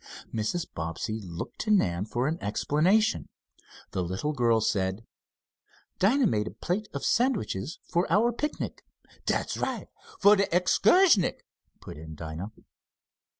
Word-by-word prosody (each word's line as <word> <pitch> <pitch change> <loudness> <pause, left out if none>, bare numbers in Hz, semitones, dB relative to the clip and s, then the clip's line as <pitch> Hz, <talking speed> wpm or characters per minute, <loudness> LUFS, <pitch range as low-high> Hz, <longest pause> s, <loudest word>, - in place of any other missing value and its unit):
Mrs. 115 +11 -1
Bobbsey 85 +6 -4
looked 85 -3 -7
to 215 - -3
Nan 95 - +2
for 120 +4 -1
an 160 +3 -2
explanation. 175 - +1 0.6
The 95 - -1
little 95 - -2
girl 120 -4 +3
said: 100 -1 -1 0.9
"Dinah 250 +8 +4
made 105 - +1
a - - -7
plate 205 +5 -2
of 140 - -4
sandwiches 200 - 0
for 175 0 0
our 220 +6 +4
picnic 295 +6 -4 0.2
" - - -27
"Dat's - - 0
right, - - -3 0.3
for 205 +1 +7
de 200 -1 +2
excursnick," 200 - +4 0.4
put - - -9
in 80 0 -9
Dinah. 80 +6 -6
140 Hz, 135 wpm, -28 LUFS, -, 0.9 s, for